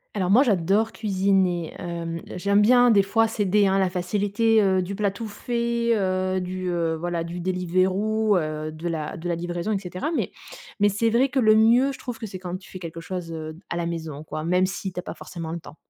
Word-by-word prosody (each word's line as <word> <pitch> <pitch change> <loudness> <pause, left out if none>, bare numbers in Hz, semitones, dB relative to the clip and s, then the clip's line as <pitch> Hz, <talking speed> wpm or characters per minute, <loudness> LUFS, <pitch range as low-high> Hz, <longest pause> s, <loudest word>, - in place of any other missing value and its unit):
Alors 185 -3 0
moi 235 +8 +6
j'adore 205 - +2
cuisiner. 190 -4 +1
Hem, 170 -1 -4
j'aime 200 +3 +2
bien 245 +2 +6
des 205 -3 +6
fois 225 +4 +2
céder 205 -2 +2
à 195 0 +2
la 190 -1 +2
facilité, 205 +5 +1
heu, 190 -2 +3
du 185 +3 -5
plat 205 0 +1
tout 205 +3 -6
fait, 235 +1 -1
heu, 185 -1 0
du, 185 0 -4
heu, 165 -2 0
voilà 175 0 -2
du 170 +1 -6
Deliveroo, 185 +4 +1
heu, 155 -1 -3
de 155 +2 -6
la 160 -2 -3
de 165 +2 -6
la 175 - 0
livraison 175 +3 -3
et 205 - +1
cetera, 185 - -4
mais - - -1 0.5
mais 205 0 +5
c'est 215 +3 +1
vrai 245 +4 +3
que 275 - 0
le 215 -3 +5
mieux, 235 +5 +5
je 265 - -8
trouve 245 -2 -7
que 220 - -5
c'est 190 - -7
quand 180 -1 -5
tu 190 - -16
fais - - -8
quelque 165 -2 -7
chose, 175 -1 -5
heu, 155 -1 -6
à - - -1
la 170 -1 -1
maison 160 -3 -5
quoi, 155 0 -5
même 180 +3 +2
si 190 0 -5
tu - - -4
as - - -2
pas - - -7
forcément 165 -2 -7
le 170 - -4
temps. 155 - -13
185 Hz, 230 wpm, -24 LUFS, 170-215 Hz, 0.5 s, moi